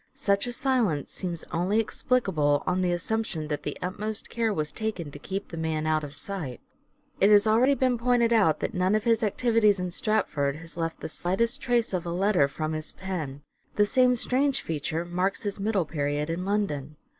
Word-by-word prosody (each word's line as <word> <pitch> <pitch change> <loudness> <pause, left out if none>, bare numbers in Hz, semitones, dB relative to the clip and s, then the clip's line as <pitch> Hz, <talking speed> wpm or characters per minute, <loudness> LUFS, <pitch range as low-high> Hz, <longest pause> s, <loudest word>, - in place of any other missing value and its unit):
Such 200 -5 +1
a - - -2
silence 240 - 0
seems 175 -3 -3
only 180 +6 +1
explicable 190 - +1
on 185 0 +1
the 180 -1 +1
assumption 175 -3 -2
that 150 - -2
the 145 - -4
utmost 210 +4 -4
care 230 -2 0
was 155 -6 -2
taken 200 -8 -4
to 145 - -10
keep 195 +5 -5
the 165 - -7
man 160 -1 -1
out 155 -1 +1
of 145 -1 -7
sight. 160 - -5 0.6
It 200 - +5
has 205 0 +6
already 240 +6 +4
been 255 -3 +1
pointed 235 -1 +3
out 195 -9 +3
that - - -2
none 185 +3 +2
of 215 - 0
his 230 -2 +3
The - - +1
silence 200 - -3
activities 225 -5 +3
in 180 -1 -3
Stratford 155 -9 0
has 165 +2 -10
left 165 -1 -3
the - - -3
slightest 230 - -1
trace 240 -4 +1
of 185 - +2
Shakspere! 170 0 -4
a 175 - -3
letter 195 -8 +3
from 155 +2 -3
his 155 0 -3
pen. 155 -7 -5 0.3
The 205 - +4
same 250 +2 +4
strange 265 +3 +1
feature 160 +2 -2
marks 180 +4 -1
his 205 -1 -3
middle 200 -3 +1
period 150 0 -2
in 175 +2 -3
London. 155 -8 -1
190 Hz, 205 wpm, -27 LUFS, 155-220 Hz, 0.6 s, has